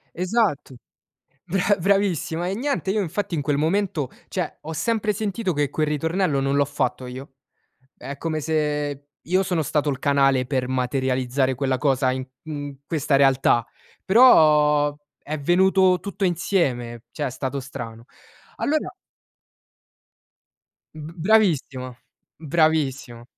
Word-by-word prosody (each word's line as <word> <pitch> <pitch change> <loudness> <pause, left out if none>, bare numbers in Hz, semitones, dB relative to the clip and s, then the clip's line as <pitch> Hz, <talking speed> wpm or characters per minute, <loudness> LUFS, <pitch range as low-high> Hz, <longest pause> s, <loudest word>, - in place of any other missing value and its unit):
esatto, 180 - 0 0.7
bra 195 +3 +1
bravissima. 180 -3 +1
E 195 - -2
niente, 260 -4 -2
io 215 - +1
infatti 190 0 -3
in 145 - -1
quel 145 0 0
momento 160 -3 0 0.2
cioè, 180 -4 -4
ho 160 - -6
sempre 215 +6 0
sentito 200 -1 -2
che 145 -2 0
quel 155 - 0
ritornello 155 0 0
non 135 +1 0
l'ho 145 - +4
fatto 140 -2 -2
io. 130 +2 -9 0.6
È 140 +3 -7
come 160 -2 -2
se 150 -2 -2 0.2
io 185 +4 +1
sono 175 -4 -1
stato 150 0 0
il 135 - -3
canale 135 -3 +2
per 130 -2 -1
materializzare 130 0 0
quella 130 0 -1
cosa 130 -2 +1
in 130 0 -4 0.2
in 145 -3 -6
questa 150 -4 +1
realtà, 135 -3 +3 0.4
però 150 - +5 0.3
è 155 +1 -4
venuto 185 +3 +3
tutto 200 +1 -4
insieme, 135 - -1
cioè 145 +2 -3
è - - -3
stato 130 +2 -4
strano. 120 -4 -8 0.5
Allora 305 +1 0 2.1
B 155 +1 -9
bravissima, 160 - +1 0.4
bravissima. 145 -6 0
150 Hz, 130 wpm, -23 LUFS, 135-180 Hz, 2.1 s, però